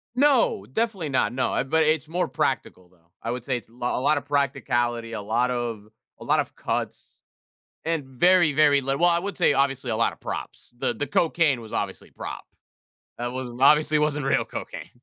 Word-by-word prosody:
No, 260 Hz, -, +3 dB
definitely 200 Hz, -, -1 dB
not, 130 Hz, -5 st, +1 dB
no, 130 Hz, +2 st, -1 dB
uh, -, -, +1 dB
but 160 Hz, +4 st, +2 dB
it's 155 Hz, -1 st, +1 dB
more 175 Hz, +2 st, -1 dB
practical 90 Hz, -8 st, -2 dB
though. 90 Hz, -, -27 dB, 0.3 s
I 115 Hz, -, -2 dB
would 125 Hz, -1 st, -5 dB
say 130 Hz, -3 st, 0 dB
it's 110 Hz, -2 st, -11 dB
lo 120 Hz, +1 st, -3 dB
lotta 145 Hz, +3 st, +2 dB
practicality, 120 Hz, -5 st, -1 dB
a 110 Hz, -, -4 dB
lot 120 Hz, +5 st, 0 dB
of 115 Hz, -4 st, -3 dB, 0.3 s
a -, -, -9 dB
lot -, -, +2 dB
of -, -, -2 dB
cuts -, -, -5 dB, 0.6 s
and 165 Hz, -2 st, -1 dB
very, 155 Hz, +5 st, +4 dB
very 145 Hz, -1 st, +4 dB
little 135 Hz, +4 st, -2 dB
well, 175 Hz, -, +6 dB
I 170 Hz, -, +3 dB
would 200 Hz, +3 st, -5 dB
say 175 Hz, -, +4 dB
obviously 135 Hz, -2 st, 0 dB
a 110 Hz, -, 0 dB
lot 115 Hz, -, +2 dB
of -, -, -17 dB
props. -, -, -7 dB
The 120 Hz, -, -1 dB
the 145 Hz, +6 st, -3 dB
cocaine 160 Hz, -6 st, +2 dB
was 110 Hz, -1 st, -11 dB
obviously -, -, -4 dB
prop. -, -, -7 dB, 0.8 s
That 120 Hz, 0 st, -2 dB
wasn't 125 Hz, -1 st, -6 dB
obviously 150 Hz, +2 st, +5 dB
wasn't 150 Hz, -2 st, 0 dB
real 135 Hz, -, +2 dB
cocaine. -, -, -7 dB
135 Hz, 195 wpm, -25 LUFS, 120-155 Hz, 0.8 s, well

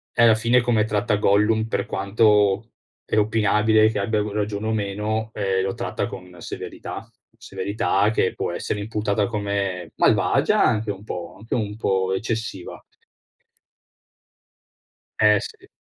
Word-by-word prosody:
Eh, 115 Hz, -, +4 dB
alla 115 Hz, -2 st, +7 dB
fine 120 Hz, +3 st, +3 dB
come 115 Hz, -3 st, +2 dB
tratta 105 Hz, 0 st, 0 dB
Gollum, 105 Hz, +2 st, +2 dB
per -, -, -1 dB
quanto 105 Hz, +1 st, +2 dB, 0.3 s
è -, -, -2 dB
opinabile 110 Hz, 0 st, +3 dB
che 110 Hz, -1 st, -2 dB
abbia 105 Hz, +1 st, 0 dB
r -, -, 0 dB
ragione 105 Hz, 0 st, -3 dB
o 110 Hz, -, 0 dB
meno, 105 Hz, +1 st, -2 dB
ehm, 95 Hz, -2 st, 0 dB
lo 95 Hz, -, -2 dB
tratta -, -, -3 dB
con 90 Hz, -1 st, -10 dB
severità; -, -, -7 dB, 0.3 s
severità 100 Hz, 0 st, 0 dB
che 100 Hz, -4 st, 0 dB
può -, -, -3 dB
essere 105 Hz, +4 st, -3 dB
imputata 105 Hz, -1 st, -1 dB
come 100 Hz, -5 st, -3 dB
malvagia -, -, +3 dB
anche 110 Hz, 0 st, +1 dB
un 100 Hz, 0 st, -6 dB
po'. 90 Hz, -4 st, -6 dB
Anche 110 Hz, +3 st, -5 dB
un 105 Hz, -3 st, -2 dB
po' 95 Hz, -3 st, 0 dB
eccessiva. 110 Hz, -3 st, -4 dB, 2.4 s
Eh 105 Hz, -1 st, +6 dB
sì. -, -, -10 dB
105 Hz, 140 wpm, -23 LUFS, 100-110 Hz, 2.4 s, alla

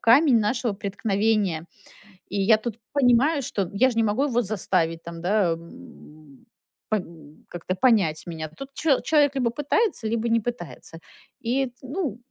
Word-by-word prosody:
камень 255 Hz, +2 st, +5 dB
нашего 235 Hz, +2 st, 0 dB
преткновения. 200 Hz, -3 st, 0 dB, 0.7 s
И 200 Hz, +1 st, -1 dB
я 215 Hz, +3 st, +5 dB
тут 225 Hz, 0 st, -6 dB
понимаю, 275 Hz, +3 st, +3 dB
что 195 Hz, -6 st, -2 dB
я 250 Hz, +6 st, +4 dB
же 230 Hz, -, -6 dB
не 225 Hz, -, +4 dB
могу 220 Hz, +5 st, +1 dB
его 245 Hz, -4 st, +1 dB
заставить, 180 Hz, -6 st, -1 dB
там, 170 Hz, 0 st, -8 dB
да, 190 Hz, 0 st, +2 dB
м, 155 Hz, -, -14 dB, 0.4 s
пон 165 Hz, -8 st, -5 dB
как-то 175 Hz, +1 st, -4 dB
понять 195 Hz, -10 st, +2 dB
меня. 160 Hz, -2 st, -5 dB
Тут 270 Hz, -, -10 dB
чел 280 Hz, -1 st, +2 dB
человек 290 Hz, -3 st, +3 dB
либо 250 Hz, -3 st, +1 dB
пытается, 295 Hz, -, 0 dB
либо 230 Hz, +1 st, -1 dB
не 230 Hz, 0 st, +3 dB
пытается. 205 Hz, -7 st, -7 dB, 0.4 s
И, 255 Hz, +4 st, 0 dB
т 245 Hz, -, -14 dB
ну, 275 Hz, -, -3 dB
220 Hz, 155 wpm, -24 LUFS, 175-250 Hz, 0.7 s, камень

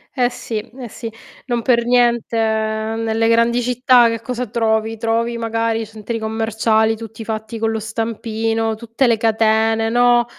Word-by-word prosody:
Eh, 245 Hz, -2 st, +2 dB
sì, 225 Hz, -3 st, -4 dB
eh 240 Hz, +2 st, -10 dB
sì, 225 Hz, +1 st, -7 dB, 0.3 s
non 240 Hz, -2 st, -1 dB
per 235 Hz, -1 st, +2 dB
niente 240 Hz, -2 st, +2 dB
nelle 220 Hz, 0 st, 0 dB
grandi 230 Hz, +1 st, +3 dB
città 250 Hz, 0 st, +4 dB
che 230 Hz, 0 st, -3 dB
cosa 250 Hz, +1 st, -4 dB
trovi? 220 Hz, 0 st, 0 dB
Trovi 230 Hz, +1 st, -1 dB
magari 225 Hz, 0 st, -1 dB
centri 220 Hz, +2 st, -6 dB
commerciali 220 Hz, 0 st, +1 dB
tutti 225 Hz, 0 st, -9 dB
fatti 220 Hz, 0 st, -5 dB
con 225 Hz, 0 st, 0 dB
lo 220 Hz, 0 st, -2 dB
stampino, 225 Hz, 0 st, -2 dB
tutte 235 Hz, +4 st, -1 dB
le 230 Hz, -2 st, +3 dB
catene, 225 Hz, 0 st, +2 dB
no, 240 Hz, 0 st, +4 dB
225 Hz, 150 wpm, -19 LUFS, 220-235 Hz, 0.3 s, città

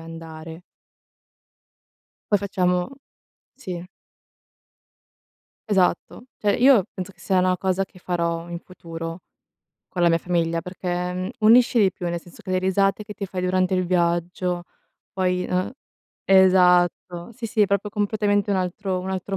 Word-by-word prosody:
andare. 165 Hz, 0 st, -9 dB, 1.7 s
Poi 205 Hz, -, +5 dB
facevamo 180 Hz, -2 st, 0 dB, 0.7 s
sì. 180 Hz, -9 st, -7 dB, 1.8 s
Esatto. 190 Hz, +3 st, +1 dB
Cioè 205 Hz, -1 st, +1 dB
io 245 Hz, -6 st, +6 dB
penso 185 Hz, +1 st, -6 dB
che 175 Hz, -, -25 dB
sia 190 Hz, 0 st, +1 dB
una 185 Hz, 0 st, +2 dB
cosa 190 Hz, +1 st, 0 dB
che 185 Hz, -, -19 dB
farò 170 Hz, -1 st, -2 dB
in 170 Hz, -, -5 dB
futuro 165 Hz, -1 st, -8 dB, 0.7 s
con 180 Hz, -, -5 dB
la 175 Hz, -, +5 dB
mia 165 Hz, -, +3 dB
famiglia, 165 Hz, -1 st, -1 dB
perchè, 180 Hz, -1 st, -3 dB
mhmm, 185 Hz, +1 st, -3 dB
unisce 235 Hz, +2 st, +5 dB
di 195 Hz, -3 st, +4 dB
più, 175 Hz, -, -6 dB
nel 170 Hz, 0 st, -2 dB
senso 175 Hz, -, -16 dB
che -, -, -7 dB
le 185 Hz, -, +2 dB
risate 195 Hz, +2 st, +1 dB
che 210 Hz, -, -8 dB
ti 200 Hz, -1 st, -5 dB
fai 185 Hz, -1 st, -4 dB
durante 185 Hz, +1 st, +1 dB
il 185 Hz, 0 st, +1 dB
viaggio, 175 Hz, 0 st, 0 dB, 0.5 s
poi 180 Hz, -1 st, 0 dB
uhm, 185 Hz, 0 st, 0 dB, 0.5 s
esatto, 180 Hz, -1 st, +4 dB
sì, 240 Hz, +1 st, -9 dB
sì, 215 Hz, 0 st, -1 dB
è -, -, +4 dB
proprio 200 Hz, +1 st, -1 dB
completamente 205 Hz, 0 st, 0 dB
un 195 Hz, -, +2 dB
altro 185 Hz, +1 st, -2 dB
un 185 Hz, +1 st, -5 dB
altro 190 Hz, +1 st, -3 dB
185 Hz, 150 wpm, -23 LUFS, 175-195 Hz, 1.8 s, io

